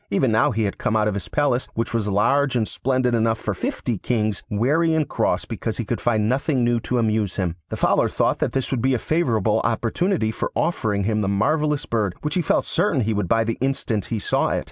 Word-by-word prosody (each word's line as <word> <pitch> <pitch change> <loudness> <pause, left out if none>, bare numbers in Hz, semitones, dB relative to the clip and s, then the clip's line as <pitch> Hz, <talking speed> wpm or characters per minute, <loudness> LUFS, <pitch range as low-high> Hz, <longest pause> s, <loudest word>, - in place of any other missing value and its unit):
Even 115 +4 +2
now 110 - +3
he 110 +1 -1
had 100 - -3
come 110 - 0
out 105 -1 +2
of 105 - 0
his 100 -2 -4
palace, 140 -4 0
which 115 +1 -2
was 115 -3 0
large 130 +7 +2
and 110 -3 +1
splendid 130 -1 0
enough 115 -1 +2
for - - -3
fifty 115 -6 -3
kings, 110 -4 -1
weary 150 +10 +2
and 155 -2 +1
cross - - 0
because - - -4
he - - -3
could - - -3
find 110 -3 +1
nothing 130 +1 +1
new 120 0 +2
to 125 +2 -2
amuse 110 -4 0
him. 90 -4 -1
The - - -4
Fowler - - +2
thought - - 0
that - - -1
this 135 -1 -1
would 130 -4 0
be 130 +1 +2
a - - +1
favourable 115 - +1
opportunity 115 - 0
for - - -3
offering 105 -12 0
him 105 +1 0
the 100 - -1
marvellous 150 +9 +1
bird, 105 -6 -1
which 150 - -2
he 185 - +1
felt 160 - +1
certain 150 -10 +1
he 110 0 0
would 105 -3 -1
buy 115 +3 +3
the 115 0 -3
instant 130 -6 -1
he 115 - -3
saw 105 - 0
it. - - 0
115 Hz, 235 wpm, -22 LUFS, 105-135 Hz, -, now